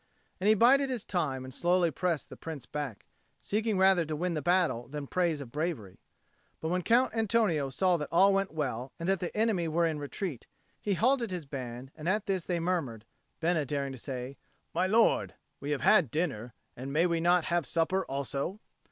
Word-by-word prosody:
And 190 - 0
he 215 - +6
bided 270 +5 +5
his 250 -5 -3
time 140 -8 -1
and 130 - -9
slowly 175 +1 +2
pressed 170 0 -1
the - - -9
Prince 155 -6 -7
back, 140 -8 -5 0.3
seeking 215 0 -1
rather 190 -2 +5
to 155 0 -3
win 175 +3 -1
the 155 - -2
battle 175 -8 +1
than 145 +2 -5
the - - -9
praise 170 -5 0
of 125 -4 -9
bravery. 145 - -3 0.6
But 160 - -3
when 180 +1 0
Count 235 +5 +3
Antonio 215 -10 +2
saw 180 +6 +2
that 150 - -5
all 195 +4 +5
went 195 0 0
well, 130 -4 -3
and 165 - -4
that 195 -1 +2
the 180 +3 -4
enemy 215 -6 +1
were 165 +2 +2
in 160 -2 -1
retreat, 145 - -5 0.3
he 200 -2 0
halted 240 +3 +2
his 180 -4 -4
band; 130 -2 -7
and 155 +3 -3
at 210 +2 +1
this 190 -3 -2
they 175 -2 0
murmured, 160 -11 -2 0.4
Bena 165 -2 +2
daring 140 0 -2
to 130 - -8
say, 130 +1 -6 0.4
"My 180 +3 +1
lord, 225 +4 +3 0.2
we 140 - -5
have 145 -2 -1
had 185 - +5
dinner, 125 -7 -2 0.2
and 130 +3 -6
may 160 +4 +3
we 170 -2 +1
not 175 0 +3
have 170 -2 0
supper 175 +3 +1
also?" 140 +7 -3
170 Hz, 205 wpm, -30 LUFS, 140-190 Hz, 0.6 s, he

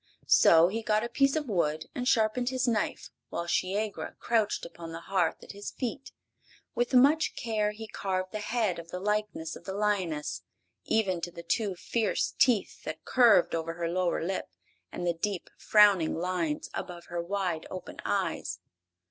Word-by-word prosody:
So 165 +1 +6
he 220 +5 -2
got 215 0 +1
a 235 - -3
piece 275 +3 +2
of 305 -3 -1
wood 155 -6 0
and 250 0 -3
sharpened 240 +1 +2
his 255 0 0
knife, 225 -3 -1 0.2
while 170 - -3
Shiegra 200 +4 -1
crouched 220 -3 0
upon 170 -1 -9
the 165 - -5
hearth 180 -2 0
at - - -9
his 205 0 -6
feet. 250 +1 -5 0.6
With 245 +2 0
much 290 +5 +5
care 215 -3 0
he 215 +1 -7
carved 185 -2 -3
the 215 - -4
head 210 -5 0
in 165 - -9
the 180 - -5
likeness 210 -5 -2
of 170 - -12
the 190 0 -4
lioness, 190 -7 -1 0.4
even 190 -6 +1
to 175 - -3
the 170 0 -10
two 205 -2 0
fierce 220 +4 0
teeth 235 -6 +2
that 155 0 -6
curved 240 -8 +5
over 165 0 -2
her 170 0 -2
lower 175 -1 0
lip 190 - -3 0.4
and 175 - -4
the 175 - +2
deep, 185 +2 -3
frowning 205 -6 +5
lines 170 -3 -2
above 175 -1 -6
her 175 0 -2
wide 180 -2 -2
open 185 - -8
eyes. - - -1
195 Hz, 175 wpm, -29 LUFS, 170-220 Hz, 0.6 s, So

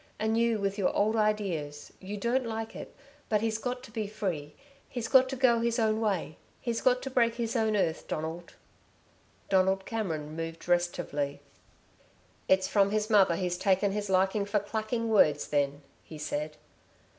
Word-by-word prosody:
And 220 +1 0
you 230 -1 +2
with 200 0 -2
your 190 - +2
old 215 +2 +2
ideas 190 -9 -1
you 200 +2 -6
don't 235 +4 0
like 225 0 -4
it - - -9 0.3
but 210 -2 +2
he's 220 -1 -1
got 250 +2 -4
to - - -12
be 215 -2 -3
free 170 -8 -4 0.3
he's 240 -2 -4
got 260 -1 +5
to 265 - -3
go 245 -3 +4
his 235 +1 0
own 220 -2 +2
way 195 -7 -1 0.2
he's 235 -2 -2
got 250 0 +3
to 270 - -4
break 235 -2 +2
his 235 0 -3
own 220 -2 +2
earth, 165 -5 0
Donald." 160 +2 -5 0.9
Donald 190 0 +2
Cameron 160 -9 -3
moved 165 0 -6
restively. 175 -5 0 1.1
"It's 190 0 +3
from 200 0 +3
his 215 +1 -1
mother 195 -5 +5
he's 180 0 -2
taken 195 +1 +2
his 205 0 -3
liking 190 +2 +2
for 205 +1 +1
clacking 220 +3 -2
words, 155 -10 +4
then," 145 0 0 0.2
he 155 - -10
said. 150 0 -4
205 Hz, 170 wpm, -29 LUFS, 175-225 Hz, 1.1 s, got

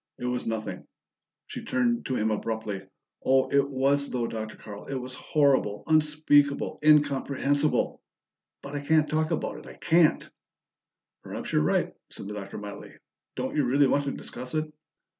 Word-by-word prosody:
"It - - -6
was 125 -1 -2
nothing 110 -1 -4 0.3
" - - -64
She - - -7
turned 120 -2 0
to 130 - -1
him 110 -1 +1
abruptly. 110 -2 -3 0.4
"Oh, 130 0 +3
it 140 0 +3
was, 140 +1 +1
though, 120 -2 -1
Dr. 110 -1 -5
Carl! 105 -1 -10
It 140 - -3
was 130 0 -5
horrible, 130 -7 +1
unspeakable, 150 -2 +3
incomprehensible! 145 -1 +2 0.6
But 140 - -8
I 145 - -2
can't 155 +2 +3
talk 155 0 0
about - - -2
it! - - -14
I - - -10
can't!" 165 -1 +3 0.9
"Perhaps - - -6
you're - - +4
right," 75 - +1 0.2
said - - -8
the 105 - -5
Doctor 100 -1 -7
mildly. 105 -1 -8 0.4
"Don't - - -3
you 150 - +3
really 140 +3 +4
want 140 +1 +2
to 140 - -1
discuss 125 +2 -6
it?" 155 0 -2
135 Hz, 165 wpm, -27 LUFS, 115-145 Hz, 0.9 s, you're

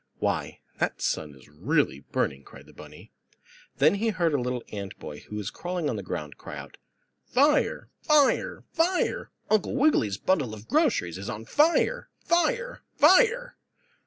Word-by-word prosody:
"Why, - - -2 0.2
that - - -1
sun 75 -2 -2
is 65 -2 -18
really 95 - 0
burning!" 70 -1 -2
cried - - -14
the - - -17
bunny. - - -13 0.7
Then 150 +5 +5
he 220 +3 0
heard 175 -6 0
a 140 - +1
little 125 -1 -3
ant 100 -2 -6
boy, 75 0 -8
who 105 - -10
was 105 -1 -4
crawling 175 -3 -3
on - - -3
the 100 - -4
ground, 75 -5 -6
cry - - -8
out: - - -10 0.5
"Fire! 290 +4 +2
Fire! 300 -3 +2
Fire! 350 +2 0 0.2
Uncle 215 +2 +2
Wiggily's 260 - +2
bundle 145 - 0
of 105 +1 -13
groceries 215 - +1
is 100 - -6
on 110 +2 -6
fire! 335 - +2
Fire! 485 +9 0 0.2
Fire!" 480 +11 +4
165 Hz, 160 wpm, -27 LUFS, -, 0.7 s, Then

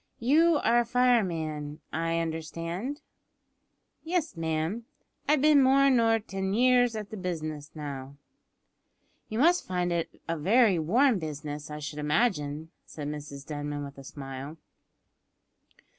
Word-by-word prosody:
"You 315 +8 +4
are 240 +1 +4
a 240 - +1
fireman, 170 -12 +1
I 165 +2 0
understand?" 165 - -4 1.0
"Yes, 330 - -1
ma'am," 160 +1 -1
replied 235 - -6
Joe, 230 - -38 0.2
"I've 280 - -1
bin 300 -2 +6
more 275 +1 +5
nor 230 -3 +4
tin 195 -2 -3
years 245 -1 +4
at 210 -2 -6
the 215 - -6
business 155 -5 -4
now." 140 -2 -6 1.1
"You 220 - -4
must 345 +7 +3
find 180 -1 -1
it 170 -1 -3
a 165 -1 -2
very 200 +2 +4
warm 230 - +3
business, 150 -2 -6
I 150 - -6
should 150 0 -6
imagine," 150 -2 0
said 150 -2 -7
Mrs 145 -2 -7
Denman, 145 -1 -4
with 140 0 -9
a - - -10
smile. 135 +2 -8
165 Hz, 140 wpm, -28 LUFS, 150-235 Hz, 1.1 s, bin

